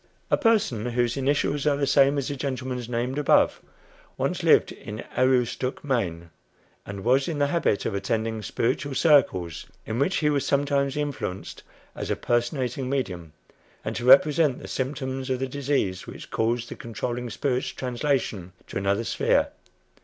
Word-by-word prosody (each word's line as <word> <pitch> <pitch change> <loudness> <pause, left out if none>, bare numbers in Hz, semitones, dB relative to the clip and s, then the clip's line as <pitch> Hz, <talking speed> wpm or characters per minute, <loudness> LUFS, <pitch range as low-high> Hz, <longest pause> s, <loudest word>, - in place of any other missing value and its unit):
A - - +6
person, 210 - +2
whose 120 0 0
initials 140 +1 0
are 145 -1 +3
the 140 - +1
same 140 +1 +4
as 140 - -1
the 145 - -3
gentleman's 130 -3 -4
named 125 +4 -1
above, 150 - +3 0.6
once - - -1
lived - - +4
in 105 +2 -8
Aroostook, 130 0 +1
Maine, 85 - -2 0.6
and 100 -1 -6
was 130 +3 +3
in 160 - -2
the 145 - +3
habit 145 -8 0
of - - -1
attending 110 +2 -1
"spiritual 135 +6 -1
circles," 120 - +2 0.2
in 110 +2 -3
which 180 +8 +1
he 150 -1 +2
was 140 -2 +1
sometimes 140 0 +1
influenced 145 -10 -4 0.3
as - - -5
a - - +1
"personating 125 +1 -1
medium," 90 - -3 0.5
and - - -3
to - - -4
represent 145 +1 +6
the - - -9
symptoms 130 0 -3
of 130 - +1
the 135 +1 -2
disease 130 -9 -1
which - - -10
caused 115 +1 0
the - - -6
controlling 120 +1 -4
spirit's 130 +1 -1
translation 125 - -2
to - - -4
another 100 +3 0
sphere. - - +1
130 Hz, 160 wpm, -25 LUFS, 115-140 Hz, 0.6 s, A